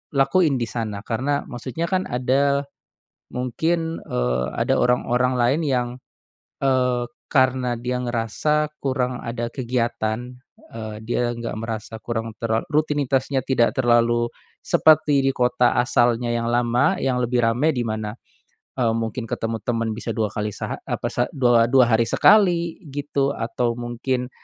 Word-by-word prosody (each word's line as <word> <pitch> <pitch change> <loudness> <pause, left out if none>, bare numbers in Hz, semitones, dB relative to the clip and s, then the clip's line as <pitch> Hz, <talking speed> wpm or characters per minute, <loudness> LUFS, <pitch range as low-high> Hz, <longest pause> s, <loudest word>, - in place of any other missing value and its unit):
lakuin 145 +1 +3
di 120 - -1
sana? 110 -2 -5
Karena, 135 +5 -1
maksudnya 130 +7 -4
kan, 185 0 0
ada, 140 +3 +1 0.7
mungkin, 160 +7 -1
eee, 60 +1 0
ada - - +1
orang-orang 125 +1 +2
lain 130 +7 +2
yang, 125 -3 0 0.7
eee, 125 -2 +1 0.3
karena 130 -2 +2
dia 125 +1 -2
ngerasa 150 +6 0
kurang 130 -2 -1
ada 115 0 -3
kegiatan, 120 -1 -2 0.4
eee, 110 -1 -6
dia 120 0 0
nggak 115 -2 -5
merasa 110 0 -5
kurang 115 -2 -4
terla 115 -1 0
rutinitasnya 145 -3 +1
tidak 120 -3 +3
terlalu 120 -1 +3 0.3
seperti 150 -3 +4
di 135 - +3
kota 125 0 +2
asalnya 120 -1 +2
yang 115 0 -1
lama, 120 0 +2
yang 130 -2 +1
lebih 120 0 +1
ramai. 120 +7 +2
Di 125 - -1
mana, 110 -1 -3 0.6
eee, 115 -3 +2
mungkin 115 +1 -3
ketemu 115 0 -2
teman 115 -2 0
bisa 115 - -3
2 110 -1 0
kali 105 -1 -3
seha - - -4
apa - - -2
sa 120 - 0
dua 120 -5 +4
2 130 -3 +6
hari 115 0 +3
sekali, 175 -5 +4
gitu. 140 -1 -1
Atau 120 0 -1
mungkin, 125 +1 -2
125 Hz, 140 wpm, -22 LUFS, 115-135 Hz, 0.7 s, 2